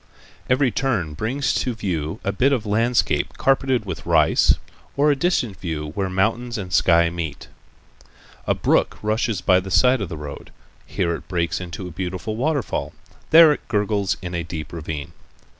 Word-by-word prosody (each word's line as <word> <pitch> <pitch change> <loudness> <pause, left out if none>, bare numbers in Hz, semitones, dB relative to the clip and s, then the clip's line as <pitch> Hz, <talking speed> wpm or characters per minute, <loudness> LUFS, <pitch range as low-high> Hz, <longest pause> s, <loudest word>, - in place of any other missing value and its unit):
Every 130 0 +3
turn 105 - -1
brings 125 - -1
to 125 -2 -1
view 85 -3 -3
a 100 - 0
bit 130 +7 +2
of 125 -6 0
landscape 115 +4 +1
carpeted 135 -3 +1
with 95 -4 -6
rice, - - +4 0.4
or 145 +1 +4
a - - +2
distant 135 - 0
view 75 -4 -4
where 95 0 -2
mountains 115 +6 0
and 95 -4 -6
sky 85 -1 +4
meet. 80 -4 -6 1.0
A - - +2
brook - - +1
rushes 110 0 0
by 90 -1 +4
the 95 +1 -7
side 120 +7 +4
of 100 - -3
the 80 - -6
road. 75 -1 -8 0.4
Here 85 -2 -1
it - - -7
breaks 85 -2 -1
into 90 +1 -6
a - - -8
beautiful 95 +5 -4
waterfall. 140 +1 -1 0.4
There 160 -1 +8
it - - -9
gurgles' 105 -3 0
in 90 -1 -5
a 85 - -1
deep 80 -2 -7
ravine. 80 -3 -5
100 Hz, 170 wpm, -22 LUFS, 85-120 Hz, 1.0 s, There